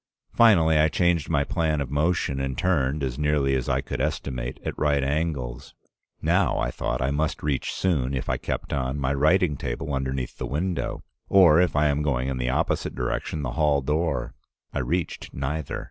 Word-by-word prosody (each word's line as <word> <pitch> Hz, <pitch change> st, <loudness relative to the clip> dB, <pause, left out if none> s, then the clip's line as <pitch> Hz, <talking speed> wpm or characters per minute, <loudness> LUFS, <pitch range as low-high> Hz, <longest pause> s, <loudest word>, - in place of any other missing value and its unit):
Finally 85 Hz, -9 st, +5 dB
I 75 Hz, -, +5 dB
changed 85 Hz, 0 st, +1 dB
my -, -, +2 dB
plan 80 Hz, -2 st, 0 dB
of 70 Hz, -2 st, -3 dB
motion 75 Hz, -2 st, 0 dB
and 65 Hz, -2 st, -3 dB
turned, 75 Hz, -5 st, +1 dB
as 65 Hz, 0 st, -3 dB
nearly 75 Hz, -2 st, +2 dB
as 65 Hz, -1 st, -1 dB
I -, -, +1 dB
could -, -, -4 dB
estimate, 60 Hz, -3 st, -3 dB
at -, -, -3 dB
right 70 Hz, -2 st, +1 dB
angles. 70 Hz, -4 st, -2 dB, 0.5 s
Now, -, -, +2 dB
I -, -, 0 dB
thought, -, -, -2 dB
I 65 Hz, -, 0 dB
must 75 Hz, +1 st, -1 dB
reach 70 Hz, -3 st, -1 dB
soon, 70 Hz, -8 st, 0 dB
if 65 Hz, -, -3 dB
I -, -, 0 dB
kept -, -, -4 dB
on, 65 Hz, -1 st, -1 dB
my 70 Hz, -1 st, 0 dB
writing 75 Hz, +2 st, +3 dB
table 70 Hz, +6 st, -4 dB
underneath 65 Hz, -1 st, -3 dB
the 65 Hz, -, -3 dB
window; 85 Hz, +8 st, -2 dB, 0.3 s
or, 90 Hz, -4 st, +7 dB
if 90 Hz, -, +1 dB
I 75 Hz, +1 st, +3 dB
am 75 Hz, 0 st, +1 dB
going 65 Hz, -3 st, 0 dB
in 65 Hz, -, -2 dB
the 60 Hz, 0 st, -1 dB
opposite 65 Hz, -, -1 dB
direction, 65 Hz, +4 st, -2 dB
the 65 Hz, -, -2 dB
hall 70 Hz, +1 st, +2 dB
door. 75 Hz, -3 st, -1 dB, 0.4 s
I -, -, -1 dB
reached 80 Hz, +7 st, -3 dB
neither. 70 Hz, +2 st, -3 dB
70 Hz, 190 wpm, -25 LUFS, 65-80 Hz, 0.5 s, or